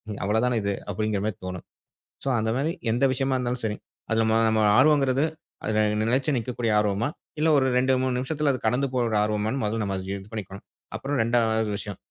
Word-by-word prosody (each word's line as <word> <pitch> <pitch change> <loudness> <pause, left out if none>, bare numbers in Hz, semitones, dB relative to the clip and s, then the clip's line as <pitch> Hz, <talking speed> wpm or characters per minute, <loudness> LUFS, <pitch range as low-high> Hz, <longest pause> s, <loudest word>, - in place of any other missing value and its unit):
இ - - -9
அவ்ளோ 105 +2 +2
தான 125 -1 +1
இது" 100 0 0 0.2
அப்படிங்குற 105 0 -1
மாரி 105 -4 -3
தோணும். 90 -1 -6 0.6
சோ, - - -1
அந்த 110 0 0
மாரி 155 +4 0 0.2
எந்த 120 +4 +1
விஷயமா 135 +1 0
இருந்தாலும் 125 0 -2
சரி, 105 -1 -1 0.3
அதில 110 0 +2
நம்ம 110 0 +3
நம்ம 110 0 +2 0.2
ஆர்வங்கிறது 135 -1 +4 0.4
அதில 110 0 0 0.3
நிலைச்சி 135 +4 +1
நிக்கக்கூடிய 120 -1 -1
ஆர்வமா? 105 +2 +1 0.3
இல்ல 155 +2 +2
ஒரு 135 - +3
2, 130 +1 +3
3 130 -1 0
நிமிஷத்துல 145 +3 0
அது 130 - -3
கடந்து 125 +5 +2
போற 125 -1 +1
ஒரு 110 - 0
ஆர்வமான்னு, 105 +5 -1
முதல்ல 110 +1 -1
நம்ம 100 -1 -2
அத 95 - -6
இது 100 0 -8
பண்ணிக்கணும். 100 -3 -6 0.3
அப்புறம் 145 +1 -2
2வது 110 -1 +2
விஷயம், 100 -1 -6
115 Hz, 200 wpm, -25 LUFS, 105-130 Hz, 0.6 s, ஆர்வங்கிறது